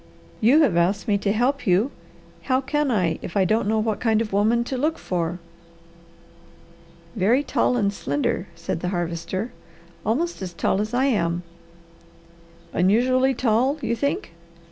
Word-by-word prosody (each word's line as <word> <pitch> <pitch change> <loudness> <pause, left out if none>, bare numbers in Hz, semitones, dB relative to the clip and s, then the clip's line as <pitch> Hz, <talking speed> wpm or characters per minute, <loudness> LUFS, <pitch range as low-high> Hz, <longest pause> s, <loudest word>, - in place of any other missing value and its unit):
"You 265 +9 +5
have 215 - +2
asked 190 +6 +1
me 205 -2 +2
to 200 - 0
help 250 +5 0
you; 195 +9 +3 0.5
how 260 -1 +2
can 295 +2 -1
I 180 -9 +1
if 190 - -5
I 190 - +4
don't 215 +2 +1
know 220 +1 +1
what 215 -1 0
kind 220 -2 +2
of 220 -3 -3
a - - +1
woman 225 +4 +3
to 260 - -4
look 305 +5 0
for?" 175 -1 -2 1.8
"Very 230 +7 +3
tall 250 -2 +1
and 200 -3 +1
slender," 145 +3 -2
said 170 -1 -4
the 180 - -2
Harvester. 175 +4 -3 0.5
"Almost 305 - -1
as 185 -2 -5
tall 195 - +1
as 215 +3 -3
I 260 +2 +2
am." 175 -9 0 1.3
"Unusually 255 +8 +3
tall 250 +5 +2
you 235 -2 -1
think?" 285 - -2
215 Hz, 160 wpm, -23 LUFS, 185-255 Hz, 1.8 s, You